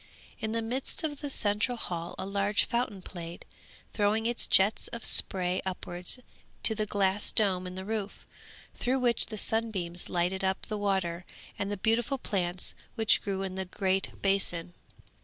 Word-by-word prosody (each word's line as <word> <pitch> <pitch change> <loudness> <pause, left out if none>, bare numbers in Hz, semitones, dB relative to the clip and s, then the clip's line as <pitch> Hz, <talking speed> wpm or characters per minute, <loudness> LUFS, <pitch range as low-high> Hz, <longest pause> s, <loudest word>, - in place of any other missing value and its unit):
In 220 -1 -2
the 230 0 0
midst 255 +7 -2
of 295 -3 -3
the 290 - -3
central 215 0 +1
hall 170 -5 -3
a - - -3
large 200 +1 +2
fountain 235 -6 -1
played, 170 -2 -8 0.5
throwing 215 +1 +2
its 240 0 +1
jets 200 +3 +4
of 235 - -6
spray 185 -1 +3
upwards 180 +1 -4 0.5
to 220 -1 +4
a 215 - 0
glass 200 0 +2
dome 185 -4 +2
in 180 - -7
the 190 0 -5
roof, 210 -1 -3 0.5
through 255 +2 +1
which 245 -3 +2
the 215 - -6
sunbeams 195 -6 0
lighted 180 +2 0
up 190 0 +1
the 215 - -3
water 190 -4 0 0.4
and 200 0 -1
the 205 - -1
beautiful 230 +7 +2
plants 180 -7 0 0.2
which 220 -3 +4
grew 195 -1 -2
in 190 -1 -3
the 190 0 -3
great 190 +1 -1
basin. 185 -3 +1
200 Hz, 165 wpm, -30 LUFS, 185-225 Hz, 0.5 s, jets